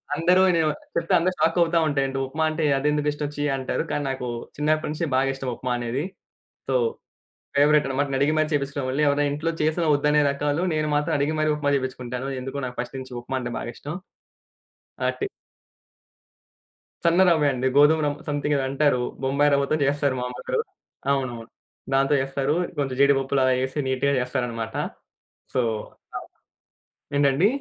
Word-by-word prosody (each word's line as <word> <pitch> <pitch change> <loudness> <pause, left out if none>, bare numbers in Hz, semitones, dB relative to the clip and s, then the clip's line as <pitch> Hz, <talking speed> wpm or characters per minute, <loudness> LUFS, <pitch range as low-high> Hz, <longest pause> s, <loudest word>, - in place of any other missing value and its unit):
అందరు 180 +4 +4
అనే 170 -2 +3
వా - - +1 0.2
చెప్తే - - 0
అందరు 185 +2 +1
షాక్ 165 +2 +2
అవుతా 170 0 +3
ఉంటా 145 -2 0
"ఏంటో 135 0 -3
ఉప్మా 155 +4 -2
అంటే 155 +1 -2
అదెందుకిష్టం? 150 +1 0
ఛీ" 145 - -2
అంటారు. 130 +4 -2
కానీ 145 - -1
నాకు 130 -2 -3 0.3
చిన్నప్పటి 155 +1 +1
నుంచి 155 +2 -2
బాగా 135 +1 +2
ఇష్టం 135 -1 -4
ఉప్మా 125 - -4
అనేది. 120 +4 -2 0.7
సో - - 0 0.8
ఫేవరైట్ 150 0 +5
అన్నమాట. 135 +2 0
నెను 135 - 0
అడిగి 145 +2 +3
మరి 155 0 +1
చేపించుకునేవాణ్ణి. 140 0 0
ఎవరైనా 145 +1 +2
ఇంట్లో 155 +3 -1
చేసిన 155 +2 +1
ఒద్దనే 150 +1 +3
రకాలు 145 +4 -1
నేను 155 -1 0
మాత్రం 150 0 0
అడిగి 145 +3 0
మరి 155 0 +2
ఉప్మా 145 -1 0
చేపించుకుంటాను. 130 0 -4
ఎందుకో 135 +2 -5
నాకు 125 0 -7
ఫస్ట్ 125 +2 -6
నుంచి 130 -1 -9
ఉప్మా 130 +2 -3
అంటే 120 0 -4
బాగిష్టం. 140 +6 -6 1.1
ఆ! - - +3
టి 410 - 0 1.8
సన్న 170 +2 +4
రవ్వే 155 -4 +3
అండి. 130 0 -2
గోధుమ 150 +2 +6
రవ్ 145 - -1
సమ్‌థింగ్ 145 0 0
ఏదో 135 - 0
అంటారు. 140 -2 +2 0.2
బొంబాయి 140 +2 +2
రవ్వతో 140 +2 +1
జేస్తారు 140 -1 +1
మా - - -2
అమ్మోళ్లు. 450 - -2 0.5
అవునవును. 125 -4 -2 0.5
దాంతో 135 +2 +3
చేస్తారు. 135 +2 -1 0.2
కొంచెం 135 -2 -1
జీడిపప్పులలా 135 -1 +3
యేసి 130 +3 -2
నీట్‌గా 130 +2 +1
జేస్తారన్నమాట. 120 -2 -3 0.8
సో 130 - +3 0.6
అవును. - - -7 0.9
ఏంటండి? 140 +6 +4
140 Hz, 160 wpm, -24 LUFS, 130-150 Hz, 1.8 s, గోధుమ